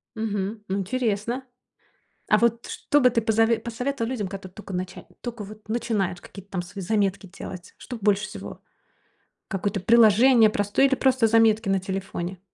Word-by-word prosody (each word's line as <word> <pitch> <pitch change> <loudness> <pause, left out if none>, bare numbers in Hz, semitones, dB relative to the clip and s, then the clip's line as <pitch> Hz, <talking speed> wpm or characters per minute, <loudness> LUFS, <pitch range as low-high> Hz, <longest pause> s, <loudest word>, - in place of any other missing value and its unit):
Мгм, 220 -2 -2 0.3
м, 195 - 0
интересно. 235 +3 -2 0.8
А - - +6
вот 235 0 +1
что 290 - +1
бы 250 - +6
ты 230 -1 +1
позове 225 +1 +2
посоветовал 240 +1 -3
людям, 210 -7 -2
которые 190 -1 -8
тока 205 -2 -9
нача 180 +1 -5 0.2
тока 235 -3 -6
вот 215 +1 -12
начинают 220 -6 -1
какие-то 195 0 -13
там 185 - -2
свои 190 +3 -8
заметки 195 -1 0
делать? 185 -1 -9
Что 250 - -8
б 220 - -19
больше 205 0 +3
всего? - - -9 0.9
Какое-то 200 +1 -2
приложение 230 +2 +6
простое 205 +6 +2
или 270 - +1
просто 260 -3 +3
заметки 225 -1 +3
на 195 -1 +2
телефоне. 190 -1 -5
215 Hz, 165 wpm, -25 LUFS, 195-235 Hz, 0.9 s, А